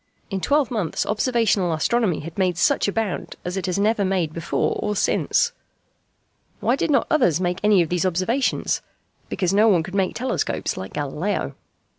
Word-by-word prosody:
In 195 -1 -2
twelve 285 -1 +2
months 200 -9 -1
observational 215 -5 +1
astronomy 210 +1 +1
had 165 +2 -8
made 185 -3 0
such 175 - +2
a - - +1
bound 220 -3 -3
as 180 +1 -3
it 190 -2 -3
has 180 - -1
never 210 +1 +2
made 185 -5 0
before 165 -1 -1
or 210 0 -1
since. 475 - +1 1.1
Why 245 - +2
did 275 - -1
not 280 - +3
others 240 - +3
make 180 -1 -1
any 205 -4 +5
of 160 - -6
these 180 0 0
observations? 185 +9 0 0.5
Because 185 -1 0
no 210 +3 +5
one 180 -7 +4
could 185 +3 -9
make 195 -2 0
telescopes 255 +2 -2
like 95 +1 -7
Galileo. 150 +7 -2
195 Hz, 175 wpm, -23 LUFS, 175-225 Hz, 1.1 s, any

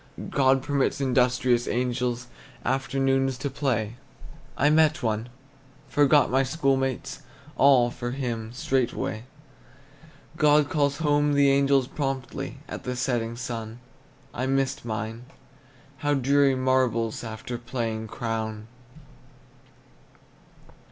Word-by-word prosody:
God 135 -1 +3
permits 140 -1 0
industrious 125 -2 +2
angels 125 0 -1 0.4
Afternoons 135 0 +1
to 140 0 -4
play. 120 -5 -1 0.6
I 145 - +4
met 155 +1 +3
one, 110 +1 -1 0.6
forgot 145 -1 +4
my 135 +1 +3
school 135 0 +1
mates, 135 -1 -3 0.3
All, 130 -3 +5
for 120 0 -5
him, 120 -4 -4
straightway. 125 -3 -2 1.1
God 150 -2 +4
calls 145 -2 +1
home 145 -2 +2
the 140 -1 +4
angels 140 -1 +3
promptly 135 -1 -4
At - - -7
the 125 0 -3
setting 120 -3 -1
sun; 115 -2 -5 0.6
I 130 +2 -2
missed 135 0 0
mine. 110 +1 -5 0.7
How 145 +2 0
dreary 140 +1 +3
marbles, 130 -4 +1
After 110 +2 -6
playing 115 -2 -3
Crown! 110 -2 -4
130 Hz, 105 wpm, -26 LUFS, 120-140 Hz, 1.1 s, All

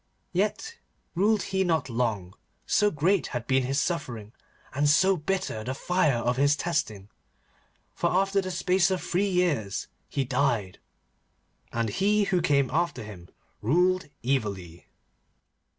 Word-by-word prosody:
Yet 215 - -1 0.3
ruled 205 +4 +2
he 190 0 0
not 160 -5 0
long, 115 -7 -2 0.3
so 210 - +3
great 175 +3 +1
had 120 -2 -4
been 130 +1 +2
his 135 +2 0
suffering, 120 - -3 0.4
and 145 +2 +2
so 190 +6 +4
bitter 155 - -2
the 130 +3 -4
fire 170 -4 +1
of 120 +1 -1
his 145 +2 +4
testing, 110 - -2 0.8
for 170 - 0
after 195 +2 +2
the 185 - -5
space 180 +1 +2
of 185 -1 0
three 185 +4 0
years 160 - 0 0.2
he 135 - -1
died. 120 -7 0 0.9
And 115 -1 -1
he 205 - +2
who 185 -3 +1
came 140 -4 +2
after 160 -5 -1
him 95 -5 -10 0.3
ruled 180 - +2
evilly. 100 -10 -2
150 Hz, 135 wpm, -27 LUFS, 120-185 Hz, 0.9 s, so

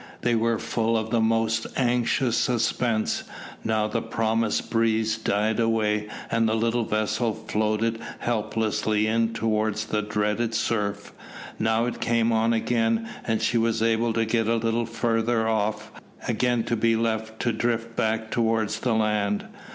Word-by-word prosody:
They 120 - +1
were 115 0 +2
full 115 0 0
of 110 0 -3
the 115 - +2
most 110 0 +1
anxious 125 -1 +1
suspense. 115 -1 0 0.4
Now 110 -1 +1
the 115 +2 -2
promised 115 -1 -1
breeze 110 -1 +2
died 110 0 0
away, 105 -2 +1 0.2
and 115 -1 +2
the 110 - +1
little 115 +1 +1
vessel 110 +1 0
floated 110 +1 -1 0.2
helplessly 110 -1 0
in 115 +1 +1
towards 110 -1 0
the 105 -1 -1
dreaded 105 +2 -1
surf. 105 -3 -1 0.5
Now 110 +1 +2
it 120 - -4
came 115 0 +2
on 115 0 +2
again, 115 0 +1 0.2
and 115 -1 0
she 115 +1 +2
was 115 0 +1
able 115 0 +2
to 115 0 +1
get 110 0 +1
a 115 - +2
little 115 0 0
farther 115 0 0
off, 110 -1 -1 0.4
again 120 -2 +1
to 120 - -1
be 115 0 +2
left 110 -1 -2
to 120 - +1
drift 115 0 -1
back 110 0 -1
towards 110 -2 0
the 120 -1 0
land. 105 -2 0
115 Hz, 150 wpm, -25 LUFS, 110-115 Hz, 0.5 s, were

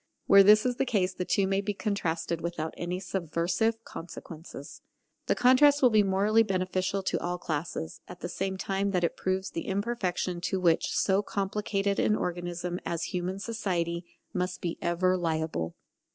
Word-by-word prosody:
Where 200 0 +8
this 210 +3 +7
is 250 -1 0
the - - +1
case 190 -5 +1
the 180 - -3
two 195 - +2
may 195 +1 +1
be 205 0 -3
contrasted 170 -5 -2
without 165 -2 -3
any 175 +1 -3
subversive 185 +5 -1
consequences. 165 -4 -9 0.5
The - - +3
contrast 280 +3 +5
will 250 - +7
be 215 -1 +6
morally 200 +3 +3
beneficial 185 -1 0
to - - 0
all 175 +1 -2
classes, 155 - -4
at - - -11
the - - -3
same 190 0 -3
time 195 +1 -1
that 180 -1 +1
it 170 - +1
proves 190 +1 -2
the 165 - -5
imperfection 190 -4 -1
to 190 +2 -1
which 170 -3 +3
so 195 0 +3
complicated 200 0 -1
an 210 - +3
organism 175 -1 -3
as 165 -1 -3
human 180 +1 -2
society 180 -6 -2 0.3
must 180 -1 -2
be 170 -2 -4
ever 185 +2 +2
liable. 160 - -2
185 Hz, 165 wpm, -29 LUFS, 175-200 Hz, 0.5 s, Where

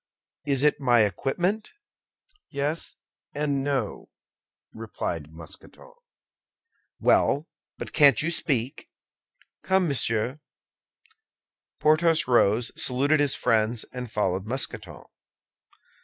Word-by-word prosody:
"Is 140 -1 +1
it 150 - +3
my 120 -3 +4
equipment?" 175 - -1 0.8
"Yes 145 +3 -3 0.4
and 145 -2 -1
no," 135 -6 -3 0.6
replied 85 -8 -5
Mousqueton. 80 - -13 1.1
"Well, 145 +4 +2 0.3
but - - -7
can't 145 -3 +6
you 160 +3 0
speak?" 130 -6 -2 0.7
"Come, 190 -1 +1
monsieur." 125 -1 0 1.4
Porthos 155 0 +3
rose, 115 -1 +3
saluted 140 +4 +1
his 145 -2 +3
friends, 115 -1 0
and 125 -2 -6
followed 95 -2 -1
Mousqueton. 110 - -4
135 Hz, 90 wpm, -25 LUFS, 110-150 Hz, 1.4 s, can't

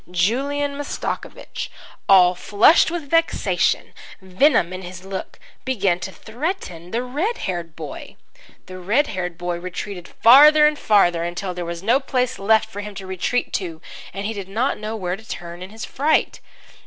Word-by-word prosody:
Julian 275 +11 0
Mastakovich, 290 - -5 0.4
all 180 -2 +7
flushed 210 - +4
with 335 -3 -5
vexation, 330 0 +1 0.3
venom 190 - +2
in 185 - -6
his 185 0 -9
look, 195 0 -6 0.3
began 200 -9 0
to 190 - -6
threaten 220 - -5
the 235 +5 -2
red 310 - -2
haired 170 -3 -4
boy. 155 -3 -8 0.5
The 185 0 -9
red 220 +11 +2
haired 180 -7 -4
boy 175 -1 -3
retreated 180 +1 -6
farther 300 +6 +7
and 300 0 +2
farther 175 -5 +3
until 180 +2 -4
there 175 -1 -5
was 170 +1 -6
no 240 +6 +3
place 255 -2 -1
left 220 +2 +3
for 205 - -7
him 205 0 -8
to 195 - -7
retreat 190 +6 -2
to, 170 -5 -3 0.3
and 195 +1 -5
he 220 - -2
did 200 -3 -7
not 235 +7 -1
know 215 +1 -4
where 180 -4 -2
to 220 - -14
turn 170 0 -7
in 185 - -7
his 220 +1 -7
fright. 300 +4 +1
195 Hz, 165 wpm, -21 LUFS, 180-255 Hz, 0.5 s, all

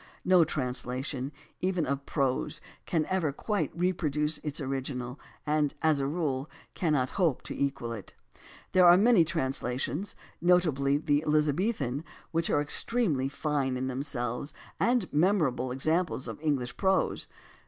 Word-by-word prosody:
No 180 -2 +6
translation 130 0 -2 0.3
even 180 -3 0
of 140 +1 -3
prose 135 -4 -1 0.3
can 160 -3 +1
ever 185 -6 0
quite 205 +8 -1
reproduce 155 -4 0
its 150 -2 -4
original, 130 -2 -4 0.3
and, 150 -1 +1
as 155 -2 +3
a 135 - 0
rule, 145 -3 -2 0.2
cannot 150 -7 +1
hope 160 -8 +2
to - - -6
equal 135 -4 -2
it. 105 -4 -9 0.6
There 185 -2 +6
are 175 +1 +9
many 215 -3 +5
translations, 140 +2 -2 0.3
notably 155 -6 +3
the 145 0 +1
Elizabethan, 150 - +1 0.3
which 165 0 0
are 145 - +2
extremely 150 - +2
fine 140 -3 -1
in 130 - -2
them 130 0 -2
selves 125 -1 -3 0.2
and 240 -5 +2
memorable 150 -7 +2
examples 155 +2 0
of - - -6
English 140 -6 -1
prose. 190 0 +1
150 Hz, 135 wpm, -29 LUFS, 130-170 Hz, 0.6 s, are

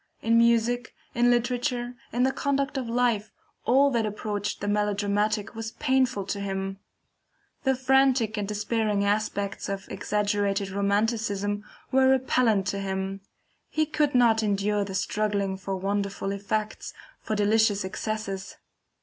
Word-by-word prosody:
In 230 +1 +4
music, 235 +1 +2 0.2
in 240 +1 +3
literature, 245 0 0 0.2
in 245 +1 +1
the 265 - +3
conduct 280 +1 -1
of 255 -3 -3
life, 235 -3 +1 0.3
all 275 +3 +4
that 235 -3 +1
approached 210 -1 -3
the 205 - -4
melodramatic 205 0 0
was 225 0 -6
painful 255 -6 +1
to 200 +1 -3
him 195 -1 -3 0.9
The 265 0 +3
frantic 260 -3 +3
and 205 -2 -2
despairing 210 -1 0
aspects 205 -1 -1
of 195 -1 -4
exaggerated 205 -1 0
romanticism 205 0 0 0.3
were 265 0 +5
repellent 250 -6 +3
to 200 - -2
him, 195 0 -3 0.5
he 310 0 +1
could 300 -2 0
not 230 -3 +5
endure 205 0 +1
the 195 -1 -6
struggling 200 -1 0
for 195 0 -4
wonderful 200 +1 -2
effects, 210 +2 -3 0.3
for 215 - -2
delicious 210 -1 +2
excesses. 195 -1 -4
210 Hz, 130 wpm, -26 LUFS, 200-240 Hz, 0.9 s, were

